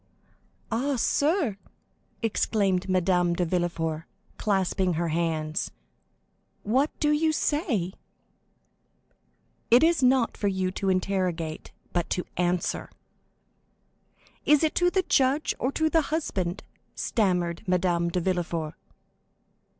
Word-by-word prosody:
"Ah, 265 +5 0
sir," 285 - +1 0.7
exclaimed 200 -4 +1
Madame 180 -1 +2
de 180 - 0
Villefort, 165 -2 -1 0.3
clasping 190 -2 +1
her 165 +1 -1
hands, 160 +1 -1 0.9
"what 260 +8 +2
do 295 - +2
you 315 +1 +3
say?" 290 - 0 1.8
"It 240 +4 +6
is 330 -2 +3
not 255 -1 +3
for 205 - 0
you 190 -1 0
to 195 +1 -2
interrogate, 185 -4 -1 0.2
but 175 -2 -1
to 180 - -1
answer." 180 0 -1 1.5
"Is 300 +1 +4
it 310 - +2
to 355 0 +3
the 375 +1 +1
judge 275 0 +2
or 255 - 0
to 315 - +1
the 325 +1 +3
husband?" 195 - -2 0.3
stammered 180 -5 0
Madame 175 -1 +1
de 180 - -1
Villefort. 170 -3 -2
190 Hz, 110 wpm, -27 LUFS, 175-265 Hz, 1.8 s, It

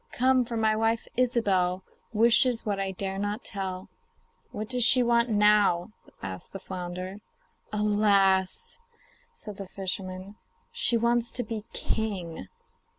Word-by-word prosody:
Come! 255 0 +3
for 235 0 -4
my 220 -1 +2
wife, 225 +1 0
Ilsebel, 195 -7 +1 0.3
Wishes 230 +2 +4
what 205 -2 -1
I 195 0 -1
dare 195 +1 -4
not 205 +1 -3
tell.' 190 -2 -4 0.6
'What 215 +1 -6
does 250 0 +2
she 245 +1 +7
want 235 0 +2
now?' 210 -3 +3 0.3
asked 95 -1 -6
the 195 - -6
flounder. 185 +1 -6 0.5
'Alas!' 205 - +2 0.6
said 210 -2 -10
the 195 - -7
fisherman, 190 +1 -5 0.3
'she 470 - +1
wants 235 0 +1
to 245 - -2
be 220 -3 -6
king. 180 - -3
210 Hz, 130 wpm, -27 LUFS, 190-235 Hz, 0.6 s, she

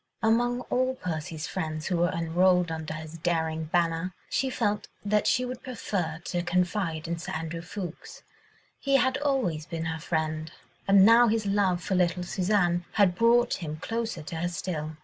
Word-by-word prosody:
Among 240 +2 +2
all 255 +1 +1
Percy's 160 -5 -4
friends 155 -4 -4
who 180 - 0
were 175 +1 +3
enrolled 175 +1 +2
under 160 -1 -4
his 160 +1 -8
daring 160 -1 0
banner, 170 +2 0 0.2
she 265 - +1
felt 205 -4 -1 0.2
that 210 0 +2
she 250 - +2
would 250 0 -6
prefer 190 -10 -3
to 175 - -1
confide 175 -2 -1
in 170 0 -3
Sir 170 - -6
Andrew 165 +1 -4
Ffoulkes. 175 -1 -8 0.6
He 275 -1 +1
had 260 0 +3
always 255 - 0
been 165 -1 -4
her 160 -1 -3
friend, 155 -1 -2 0.4
and 195 -1 +7
now 230 +2 +7
his 220 -1 +1
love 195 -3 +1
for 190 - -2
little 180 -1 +2
Suzanne 180 -1 +1
had 200 -4 +4
brought 235 +5 +4
him 155 -2 -4
closer 225 -1 -3
to 165 +1 -6
her 175 +2 -1
still. 160 -3 -4
175 Hz, 170 wpm, -27 LUFS, 160-210 Hz, 0.6 s, and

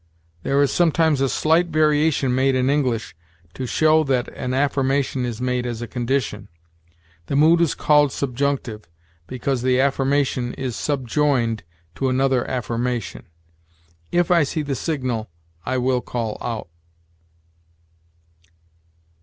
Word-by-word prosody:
There 135 +9 +1
is 140 - +1
sometimes 160 -4 +2
a 135 - +2
slight 165 +6 +2
variation 150 -4 +2
made 130 +1 +2
in 130 +1 +2
English, 125 - -1 0.4
to 130 - -5
show 155 +4 +3
that 130 -3 0
an 125 -1 -5
affirmation 135 -1 0
is 120 -2 -4
made 125 0 -1
as 120 -2 -4
a - - -5
condition. 125 +2 -2 0.8
The - - -2
mood 160 +4 +5
is 170 - +2
called 150 -2 +3
'subjunctive,' 125 -7 -2 0.4
because 130 0 -2
the 130 0 +2
affirmation 135 -2 +1
is 130 -4 -4
subjoined 130 -4 0 0.3
to 135 +6 -1
another 130 -1 +1
affirmation: 120 -2 -3 0.8
'If 175 0 +1
I 170 -1 +5
see 150 +2 -1
the 140 -1 -3
signal, 130 - -3 0.4
I 130 0 0
will 125 0 +1
call 115 -4 -4
out.' 115 -7 -4
130 Hz, 130 wpm, -22 LUFS, 125-145 Hz, 0.8 s, mood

